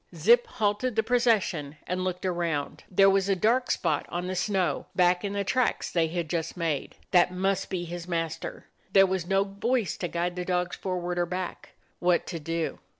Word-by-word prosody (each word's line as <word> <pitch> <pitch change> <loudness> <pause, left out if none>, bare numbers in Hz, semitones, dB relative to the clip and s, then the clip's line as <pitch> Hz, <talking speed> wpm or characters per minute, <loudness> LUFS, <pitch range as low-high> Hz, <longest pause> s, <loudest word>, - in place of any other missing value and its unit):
Zip 485 0 +5
halted 215 - -1
the 220 - +2
procession 215 - +1
and 185 +1 -2
looked 185 0 -3
around. 170 -5 -2
There 195 +1 +5
was 195 0 +3
a 195 - +3
dark 235 +7 +2
spot - - 0
on 175 +1 -3
the 185 +1 -3
snow 190 -1 0
back 180 0 +3
in 200 -1 -2
the 200 0 -1
tracks 255 +5 0
they 165 -2 +2
had 170 0 -3
just 165 +1 -3
made. 160 -5 -2 0.2
That 180 0 +5
piust 190 +1 -1
be 180 -2 -2
his 175 0 -6
master. 165 -2 -3 0.3
There 195 -1 +7
was 190 -2 -2
no 195 +1 +3
voice 210 +3 -1
to 175 - -2
guide 175 +1 -2
the 180 - -3
dogs 180 0 -1
forward 180 -2 -3
or 175 - +1
back. 180 +1 -5 0.3
What 175 -1 +2
to 165 - -3
do? 165 +1 -3
180 Hz, 195 wpm, -27 LUFS, 175-200 Hz, 0.3 s, There